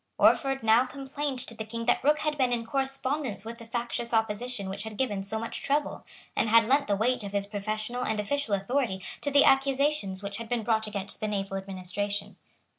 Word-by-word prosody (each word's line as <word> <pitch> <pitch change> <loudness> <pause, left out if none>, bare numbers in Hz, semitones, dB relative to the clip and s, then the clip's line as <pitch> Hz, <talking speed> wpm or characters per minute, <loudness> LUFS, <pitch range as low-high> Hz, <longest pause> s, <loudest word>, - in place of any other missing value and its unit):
Orford 270 -3 +4
now 225 +3 +5
complained 275 +1 -4
to 230 - -6
the 220 - -5
King 230 +1 -5
that 245 - +2
Rooke 300 +2 +5
had 305 -1 0
been 260 -4 +2
in 235 -1 0
correspondence 270 -3 -1
with 230 +1 -7
the 230 - -11
factious 235 0 -2
opposition 220 -1 -1
which 195 +1 -3
had 215 0 -6
given 210 -7 0
so 200 +3 -3
much 230 +1 -4
trouble, 290 +1 0 0.3
and 225 - +2
had 230 0 +6
lent 275 +4 +3
the 200 - +2
weight 245 +3 +1
of 200 0 -6
his 200 -1 +1
professional 215 +4 -3
and 220 -2 -1
official 220 +1 0
authority 195 -2 -1 0.2
to 285 - -1
the 285 0 +6
accusations 270 -7 +2
which 200 0 -3
had 230 0 -7
been 240 -2 0
brought 220 0 +1
against 200 -2 -4
the 215 - -1
naval 195 -2 -2
administration. 195 +1 -3
225 Hz, 205 wpm, -28 LUFS, 205-265 Hz, 0.3 s, had